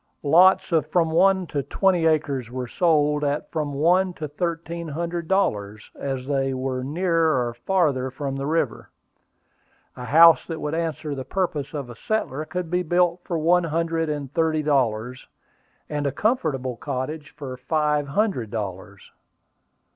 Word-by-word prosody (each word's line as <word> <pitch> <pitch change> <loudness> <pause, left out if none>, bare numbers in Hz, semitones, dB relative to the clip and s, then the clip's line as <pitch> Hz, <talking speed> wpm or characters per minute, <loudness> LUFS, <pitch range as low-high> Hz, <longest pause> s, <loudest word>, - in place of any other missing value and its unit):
Lots 185 +5 +5
of 160 -3 +2
from 165 0 +1
one 190 +2 +3
to 145 -4 -2
twenty 180 +2 +1
acres 145 -6 0
were 125 0 -5
sold 150 -1 +2
at 145 +1 -2
from 150 -3 -2
one 180 +5 +3
to 155 - -5
thirteen 170 +2 -4
hundred 170 +2 -4
dollars, 105 - -1
as 135 -2 -4
they 135 -1 0
were 130 0 -3
nearer 160 -2 +1
or 120 - -5
farther 135 -1 0
from 135 +1 -4
the 135 +1 -3
river. 165 +2 -1 1.1
A 125 - -7
house 165 +4 +7
that 165 -2 -5
would 150 0 -3
answer 160 -2 -2
the 135 -2 -5
purpose 155 -1 -2
of 140 -4 -4
a - - -10
settler 155 - -2
could 180 0 -5
be 180 0 +1
built 175 +1 +1
for 170 - -2
one 170 +2 +3
hundred 165 0 -1
and 145 -2 -4
thirty 160 -2 +1
dollars, 125 -4 0 0.6
and 145 -1 -2
a - - 0
comfortable 140 - -1
cottage 145 +3 -5
for 135 -3 -6
five 150 +2 0
hundred 145 - 0
dollars. 100 -2 -6
150 Hz, 155 wpm, -24 LUFS, 135-170 Hz, 1.1 s, house